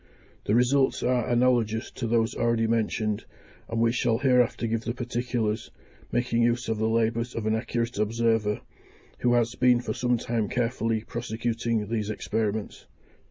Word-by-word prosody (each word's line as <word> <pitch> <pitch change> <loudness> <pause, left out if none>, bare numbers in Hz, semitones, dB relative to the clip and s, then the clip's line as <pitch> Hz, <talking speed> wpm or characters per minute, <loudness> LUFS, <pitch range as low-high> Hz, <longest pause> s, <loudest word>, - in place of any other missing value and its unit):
The 105 - +2
results 130 +3 +3
are 125 -2 +1
analogous 120 -2 +2
to 120 - -4
those 115 0 +1
already 115 -1 +1
mentioned, 110 -2 0 0.4
and 115 - -2
we 115 0 +3
shall 120 -1 +1
hereafter 125 -3 +2
give 115 0 -1
the 115 +1 -4
particulars, 120 -3 -2 0.4
making 120 -1 +1
use 120 +2 +1
of 110 -1 -1
the 110 0 +1
labours 115 +1 0
of 115 - -3
an 110 - +2
accurate 115 0 -2
observer, 110 -1 +1 0.6
who 120 0 +2
has 120 0 +2
been 125 -1 +4
for 120 - -3
some 125 -1 +1
time 115 -3 -2
carefully 115 -2 -1
prosecuting 115 -2 -2
these 110 -1 -2
experiments. 110 0 -3
115 Hz, 155 wpm, -26 LUFS, 110-120 Hz, 0.6 s, been